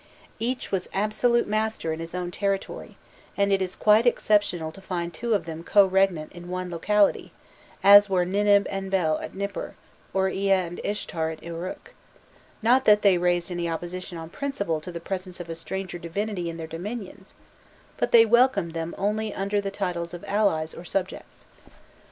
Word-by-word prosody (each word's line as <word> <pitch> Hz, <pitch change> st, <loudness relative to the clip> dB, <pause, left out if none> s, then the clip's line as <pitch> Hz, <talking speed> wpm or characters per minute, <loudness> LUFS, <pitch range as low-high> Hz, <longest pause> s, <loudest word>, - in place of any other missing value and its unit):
Each 245 Hz, +3 st, -2 dB
was 190 Hz, -2 st, -2 dB
absolute 215 Hz, +4 st, +2 dB
master 215 Hz, -6 st, -1 dB
in 160 Hz, -, -6 dB
his 165 Hz, +1 st, -6 dB
own 180 Hz, -1 st, -3 dB
territory, 195 Hz, +1 st, -3 dB, 0.4 s
and 200 Hz, 0 st, +2 dB
it 195 Hz, -, +2 dB
is 185 Hz, -1 st, -3 dB
quite 215 Hz, +3 st, +4 dB
exceptional 205 Hz, -8 st, +2 dB
to 195 Hz, -, -13 dB
find 175 Hz, -2 st, -4 dB
two 230 Hz, +6 st, 0 dB
of 200 Hz, -, -1 dB
them 165 Hz, 0 st, -7 dB
co 200 Hz, +3 st, +5 dB
regnant 190 Hz, -5 st, +1 dB
in 175 Hz, 0 st, -10 dB
one 180 Hz, 0 st, -4 dB
locality, 205 Hz, +4 st, +2 dB, 0.5 s
as 205 Hz, +1 st, +9 dB
were 180 Hz, -2 st, +2 dB
Ninib 200 Hz, +2 st, +3 dB
and 195 Hz, -1 st, -4 dB
Bel 175 Hz, -5 st, +1 dB
at -, -, -8 dB
Nipur, 200 Hz, +1 st, -4 dB, 0.4 s
or 190 Hz, 0 st, +1 dB
Ea 195 Hz, +1 st, +1 dB
and 175 Hz, -2 st, -1 dB
Ishtar 165 Hz, -6 st, -2 dB
in 155 Hz, -, -14 dB
Uruk; 170 Hz, +2 st, -7 dB, 0.7 s
not 255 Hz, +4 st, +4 dB
that 210 Hz, 0 st, +5 dB
they 190 Hz, -3 st, +5 dB
raised 175 Hz, 0 st, +1 dB
any 175 Hz, -1 st, -2 dB
opposition 175 Hz, +2 st, -5 dB
on 165 Hz, 0 st, -8 dB
principle 200 Hz, -, -2 dB
to 180 Hz, -, -8 dB
the 170 Hz, -, -6 dB
presence 185 Hz, +1 st, -5 dB
of 170 Hz, -1 st, -6 dB
a -, -, -2 dB
stranger 180 Hz, +1 st, -5 dB
divinity 175 Hz, +1 st, -3 dB
in 165 Hz, -, -6 dB
their 165 Hz, -, -5 dB
dominions, 190 Hz, +4 st, -7 dB, 0.6 s
but -, -, -1 dB
they 230 Hz, -1 st, +8 dB
welcomed 225 Hz, -7 st, +3 dB
them 165 Hz, 0 st, -4 dB
only 210 Hz, +2 st, -1 dB
under 200 Hz, +1 st, 0 dB
the 200 Hz, -, -3 dB
titles 175 Hz, -3 st, -3 dB
of 175 Hz, -, -10 dB
allies 195 Hz, -7 st, +1 dB
or -, -, -9 dB
subjects. 185 Hz, +1 st, -4 dB
190 Hz, 180 wpm, -25 LUFS, 170-205 Hz, 0.7 s, as